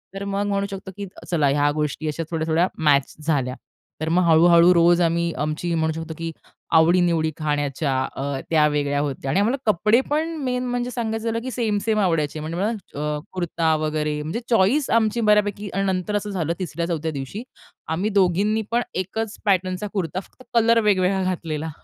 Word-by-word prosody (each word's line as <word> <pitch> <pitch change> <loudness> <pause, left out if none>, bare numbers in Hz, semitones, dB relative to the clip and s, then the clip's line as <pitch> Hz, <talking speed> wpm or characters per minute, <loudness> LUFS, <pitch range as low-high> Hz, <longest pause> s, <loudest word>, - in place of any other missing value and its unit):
तर 195 - -4
मग 200 +1 -1
म्हणू 200 0 0
शकतो, 190 0 -7
की 200 - -4 0.2
चला 155 -5 +2
ह्या 145 +1 +2
गोष्टी 150 +1 -2
अशा 155 +2 -2
थोड्या-थोड्या 165 +2 +1 0.2
मॅच 140 -3 +3
झाल्या. 135 -5 0 0.5
तर 160 - -1
मग 180 +2 +3
हळू-हळू 170 +2 +6
रोज 175 0 +4
आम्ही 170 0 +1
आमची 155 +3 -2
म्हणू 160 -1 0
शकतो, 160 0 -6
की 165 0 -4 0.5
आवडी-निवडी 165 -1 +3
खाण्याच्या 145 -2 -1 0.2
अ, 140 0 -3
त्या 155 -2 +4
वेगळ्या 145 -1 0
होत्या 140 -2 -3
आणि 190 - +2
आम्हाला 230 +7 +2
कपडे 215 +6 +3
पण 320 +3 0
मेन 250 -1 -1
म्हणजे 245 0 -2
सांगायचं 225 -2 -3
झालं 230 0 0
की 260 - -4
सेम-सेम 220 -2 0
आवडायचे 160 -5 0
म्हणजे 160 +2 -5
मला 205 +4 +1 0.3
अ, 150 0 -1
कुर्ता 165 -3 0
वगैरे 150 -1 -1
म्हणजे 160 +9 -3
चॉईस 235 +7 +3
आमची 220 +1 0
बऱ्यापैकी 210 -1 +2
आणि 195 - 0
नंतर 185 +3 -2
असं 205 0 -2
झालं 170 -5 -1
तिसऱ्या 170 -2 -3
चौथ्या 160 -2 -2
दिवशी 140 - -6 0.4
आम्ही 180 +6 -1
दोघींनी 200 +2 +2
पण 240 +1 +2
एकच 215 +4 -3
पॅटर्नचा 185 0 +1
कुर्ता 185 -2 -2
फक्त 255 - -15
कलर 230 0 +4
वेगवेगळा 190 -2 +2
घातलेला. 160 -4 -3
175 Hz, 175 wpm, -23 LUFS, 155-205 Hz, 0.5 s, हळू-हळू